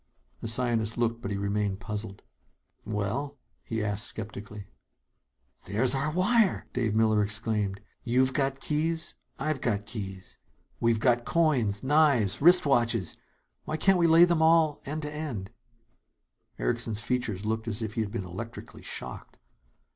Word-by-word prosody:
The - - -5
scientist 115 -1 0
looked; 115 -1 0
but 100 - -4
he 100 - -2
remained 100 0 -1
puzzled. 105 -1 -6 0.6
"Well 110 +8 -3
?" - - -44
he 110 -1 -3
asked 105 +1 -2
skeptically. 105 -1 -8 1.0
"There's 120 +6 +1
our 140 +3 0
wire!" 190 +5 +2
Dave 115 -4 0
Miller 110 -1 +3
exclaimed. 105 -1 -1 0.2
"You've 130 +2 +2
got 135 0 0
keys; 160 +3 -1 0.2
I've 150 -1 -2
got 105 -3 -1
keys. 95 -4 -7 0.4
We've 115 -1 +2
got 120 0 +3
coins, 125 -13 +1
knives, 135 -8 +4
wristwatches. 130 - +4 0.5
Why 155 - -2
can't 190 +3 +4
we 170 - +4
lay 165 +1 +8
them 170 -2 +1
all 160 -2 +4
end 155 +2 -3
to 150 - -3
end 120 -11 -5 0.6
" - - -48
Erickson's 115 -3 -1
features 115 -4 -2
looked 110 +1 -2
as 110 0 -3
if 110 -1 -4
he 115 - -1
had 110 - -2
been 100 -3 -4
electrically 115 +6 -8
shocked. - - -6
115 Hz, 145 wpm, -28 LUFS, 105-145 Hz, 1.0 s, lay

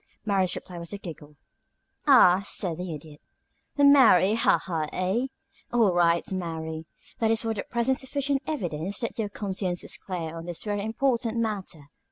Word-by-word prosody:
Mary's 190 -3 +1
reply 180 -2 -8
was 170 0 -6
a 205 - -4
giggle. 155 -5 -10 0.7
"Ah!" 190 -10 +7
said 180 -4 0
the 180 -1 -5
Idiot. 150 -1 -10 0.6
"The 285 - +3
merry 255 -9 +6
ha 230 - +4
ha, 160 -4 -3
eh? 190 +8 0 0.4
All 225 -6 +3
right, 170 -1 +3
Mary. 160 -3 -4 0.3
That 225 - +2
is 225 0 +2
for 225 0 -1
the 205 - -3
present 240 +2 0
sufficient 275 +1 -1
evidence 190 - -3
that 230 - -4
your 210 -2 -1
conscience 190 -3 -3
is - - -4
clear 165 -4 -5
on 165 +1 -8
this 175 -2 -4
very 205 -1 -2
important 235 0 0
matter. 195 -10 -3
190 Hz, 170 wpm, -26 LUFS, 170-230 Hz, 0.7 s, Ah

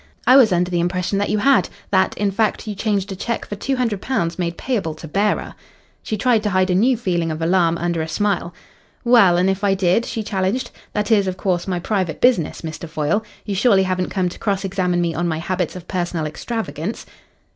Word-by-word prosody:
"I 255 - +7
was 250 -6 +7
under 180 0 +1
the 175 - +1
impression 180 +2 0
that 205 - 0
you - - +1
had 270 +6 +3 0.2
that, 190 -1 +2
in 205 -1 +1
fact, 220 +2 0
you 210 - -2
changed 200 -1 -1
a - - -4
cheque 230 +5 -3
for 205 - -6
£200 220 -6 -1
made 170 -1 -2
payable 205 -12 -2
to 160 - -9
bearer." 200 +6 0 0.5
She 215 - -3
tried 230 +1 +2
to 210 - -1
hide 185 -1 +2
a - - +3
new 235 +7 +3
feeling 175 -7 -1
of 155 0 -3
alarm 170 0 +2
under 170 -1 -1
a 160 - -3
smile. 185 0 -1 0.5
"Well, 215 -8 +5
and 180 +1 +2
if 195 +1 -1
I 195 -1 +3
did?" 190 +4 +2
she 220 - -4
challenged. 200 +4 -1 0.2
"That 210 +2 -1
is, 200 -3 +4
of 185 0 -3
course, 180 -2 -1
my 185 -2 -1
private 185 -3 -2
business, 240 -11 +2
Mr. 160 0 -6
Foyle. 155 +7 0 0.2
You 205 - -3
surely 195 -1 +4
haven't 185 -1 -1
come 185 -2 0
to 175 - -11
cross 195 -2 -1
examine 180 -2 0
me 170 -1 0
on 175 +3 -1
my 160 -2 -1
habits 180 +1 -2
of 180 -1 -9
personal 175 -3 -2
extravagance?" 205 +3 -4
190 Hz, 215 wpm, -20 LUFS, 175-210 Hz, 0.5 s, I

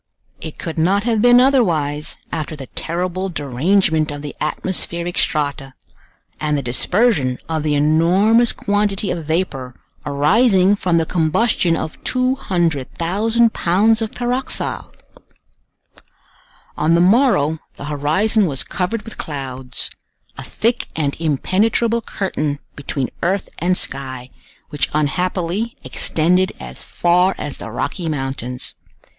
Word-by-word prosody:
It 160 - -8
could 165 -1 -4
not 195 +5 +2
have 225 -2 +1
been 245 +1 +7
otherwise 165 - +2
after 155 -1 -3
the 140 -3 -8
terrible 180 +6 -3
derangement 155 +2 +1
of 145 0 -6
the 145 - -6
atmospheric 170 +2 -2
strata, 140 -3 0 0.6
and 150 -1 0
the 140 - -3
dispersion 135 - +1
of 160 -1 -1
the 150 -1 0
enormous 180 +10 +4
quantity 205 -1 0
of 165 -3 -4
vapor 140 -7 -2 0.2
arising 185 - +3
from 180 -4 +1
the 165 - +2
combustion 170 +1 +1
of 155 - -6
200,000 215 - +1
pounds 215 +6 +3
of 220 - -1
pyroxyle! 245 +2 -2 1.8
On 160 +2 +2
the - - +4
morrow 180 - +3 0.2
the - - -7
horizon 170 +9 +2
was 135 -4 -1
covered 200 +4 -2
with 225 - -10
clouds—a 130 -3 -7
thick 235 +2 -1
and 145 -3 -1
impenetrable 215 - +1
curtain 150 -9 -2 0.2
between 140 -2 -3
earth 190 +3 0
and 180 +2 +1
sky, 130 -2 -5 0.4
which 145 -3 0
unhappily 180 +7 -1
extended 180 +4 +1
as - - -9
far 180 +2 +2
as 145 -2 -5
the - - -7
Rocky 160 - -3
Mountains. 135 -3 -4
170 Hz, 120 wpm, -19 LUFS, 145-205 Hz, 1.8 s, been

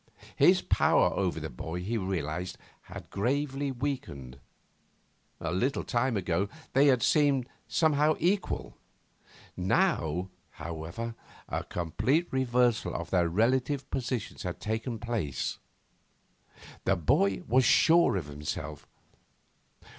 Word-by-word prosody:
His - - +5
power - - +3
over 90 -4 -1
the 80 -1 -6
boy, 80 +8 -5
he 110 +5 -2
realised, 90 -3 -3 0.3
had - - -9
gravely 135 +5 -1
weakened. 95 - -5 1.0
A 85 - -3
little 125 +10 0
time 120 -1 0
ago 95 +1 0 0.2
they 140 +2 +5
had 125 -5 +4
seemed 140 -4 +3 0.2
somehow 155 -1 +3
equal. 190 +4 -1 0.8
Now, 95 - +1 0.2
however, 85 +9 -5 0.3
a - - -2
complete 130 - 0
reversal 125 -3 +1
of - - -5
their 85 -3 +3
relative 130 - +1
positions 125 -4 -3
had 90 -2 -4
taken 110 +2 -3
place. 110 - -3 1.3
The 95 - +3
boy 95 +3 +2
was 130 +3 +4
sure 165 +4 +5
of 85 - -3
himself. 75 0 -6
110 Hz, 110 wpm, -29 LUFS, 85-135 Hz, 1.3 s, His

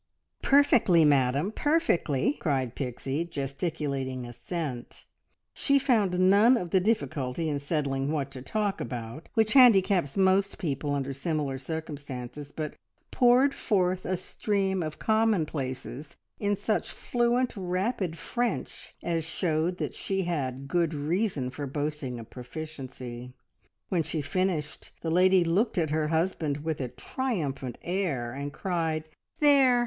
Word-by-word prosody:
"Perfectly, 245 - +5
madam, 140 +5 +3
perfectly!" 290 - +1
cried 130 -6 0
Pixie, 135 +4 -3
gesticulating 140 -4 -3
assent. 125 +1 -6 0.5
She 280 -1 +3
found 215 -9 +2
none 205 +7 +6
of 175 -6 -4
the 190 - +5
difficulty 155 - -1
in 145 -2 -1
settling 140 -2 -1
what 140 -3 -2
to 130 -1 -8
talk 205 +8 -1
about 120 +5 -6
which 220 -1 +3
handicaps 195 - +5
most 195 +1 +3
people 145 -5 -2
under 135 -1 -2
similar 140 -2 -2
circumstances, 145 -2 -6
but 155 0 -4 0.4
poured 255 +2 +5
forth 185 -4 +1
a 185 0 -1
stream 190 0 -1
of 155 -2 -4
commonplaces 155 - -1 0.2
in 205 0 +1
such 210 +2 -1
fluent, 240 +1 0
rapid 185 -1 -1
French 235 +7 -3
as 165 -2 0
showed 165 +1 0
that - - -3
she 195 -1 -1
had 140 -6 -3
good 165 +1 +1
reason 150 - -1
for 145 +1 -5
boasting 145 -3 -3
of 115 - -9
proficiency. 125 -3 -7 0.6
When 180 -3 +2
she 155 -1 -3
finished, 175 -2 -2
the 165 - -2
lady 185 +1 +5
looked 190 +8 +1
at 160 -4 +1
her 155 0 +1
husband 160 -3 0
with 160 -3 -2
a 130 - -1
triumphant 140 - -3
air, 165 -11 -1
and 140 +2 -4
cried 160 -1 -1 0.4
"There! 275 -4 +6
160 Hz, 130 wpm, -28 LUFS, 140-195 Hz, 0.6 s, none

